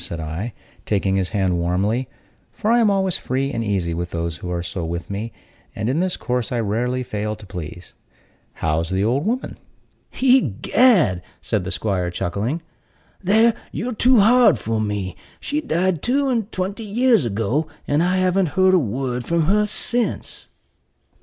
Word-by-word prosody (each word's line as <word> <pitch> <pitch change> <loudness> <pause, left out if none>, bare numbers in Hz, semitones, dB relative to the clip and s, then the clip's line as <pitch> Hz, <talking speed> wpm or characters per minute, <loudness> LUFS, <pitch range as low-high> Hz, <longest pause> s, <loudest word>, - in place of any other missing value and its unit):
said 85 - -5
I, 80 +9 -4 0.3
taking 100 -2 0
his 95 -2 0
hand 95 -4 0
warmly 100 +9 0 0.4
(for 220 +1 -1
I 240 - +5
am 225 -3 +4
always 190 -2 +2
free 135 +2 -2
and 115 - -2
easy 95 -6 -1
with 85 +1 -3
those 85 -1 -3
who 90 - -7
are 85 -1 -2
so 90 0 -4
with 85 +3 -4
me; 105 +4 -4 0.4
and 110 - -2
in 140 +5 +1
this 185 0 0
course 125 -4 -2
I 120 - 0
rarely 120 +4 -1
fail 105 -2 -3
to 105 - -13
please). 90 -2 -8 0.6
"How's 80 +2 -1
the 95 +1 0
old 130 - +1
woman?" 250 +3 -2 0.6
"Egad," 235 - +4 0.2
said 105 -5 -2
the - - -3
'squire, 95 -3 -1
chuckling, 105 - -2 0.6
"there 220 +5 +4 0.2
you're 245 +3 -3
too 250 +2 +4
hard 240 - +6
for 110 +1 -2
me; 100 -4 -2 0.2
for - - -16
she 300 +1 0
died 180 - 0
two 275 +2 +1
and 230 -4 -1
twenty 190 +4 -3
years 230 - +3
ago, 115 +7 -1 0.2
and 145 +2 +2
I 180 +2 +2
haven't 185 -2 +1
heard 185 0 +5
a 185 - +6
word 125 0 -2
from 170 +5 +1
her 210 +6 +2
since." 240 +3 -2
125 Hz, 170 wpm, -21 LUFS, -, 0.6 s, hard